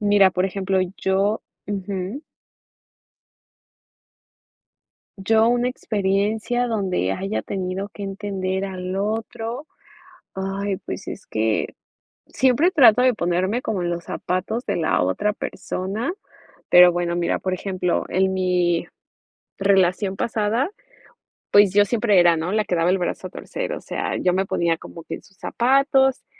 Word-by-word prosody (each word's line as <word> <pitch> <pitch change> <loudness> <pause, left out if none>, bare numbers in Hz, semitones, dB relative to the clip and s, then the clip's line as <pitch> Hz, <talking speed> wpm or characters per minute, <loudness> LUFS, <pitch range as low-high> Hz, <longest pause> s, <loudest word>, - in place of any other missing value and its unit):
Mira, 205 -2 +5
por 180 - 0
ejemplo, 190 0 0 0.2
yo 195 +3 +1 0.3
Ujú. 200 +5 -4 3.0
¿Yo, 220 +3 +3
una 245 +1 +2
experiencia 215 +2 0
donde 190 - -1
haya 195 - -2
tenido 190 +1 -4
que 200 - -9
entender 195 -1 -3
al 185 -1 -5
otro? 225 +5 -3 0.7
Ay, 195 0 -3
pues, - - -7
es 195 - -7
que 110 0 -1 0.5
siempre 265 +8 +3
trato 250 - +6
de 255 0 +4
ponerme 185 +4 0
como 215 -10 -2
en 175 - -1
los 170 -1 -4
zapatos 190 +7 -3
de - - -1
la 160 - +1
otra 150 - 0
persona, 210 - -4 0.6
pero 180 0 +8
bueno, 175 0 -1
mira, 170 - 0
por 185 - -2
ejemplo, 185 -1 -1
en 190 +1 +1
mi 180 -2 +1 0.7
relación 195 0 +2
pasada, 230 - 0 0.8
pues, 205 -2 +6
yo 205 0 +5
siempre 210 -3 +3
era, 175 -1 +5
¿no?, 165 +3 -2
la 215 0 +1
quedaba 175 -1 +1
el 190 - +3
brazo 185 +1 -3
a - - -14
torcer, - - -5
o - - -4
sea, - - -3
yo 180 -1 +1
me 190 +1 +1
ponía 170 -3 +1
como 165 - -11
que - - -5
en - - -13
sus 195 - -23
zapatos, 270 +1 +2
195 Hz, 140 wpm, -22 LUFS, 185-220 Hz, 3.0 s, pero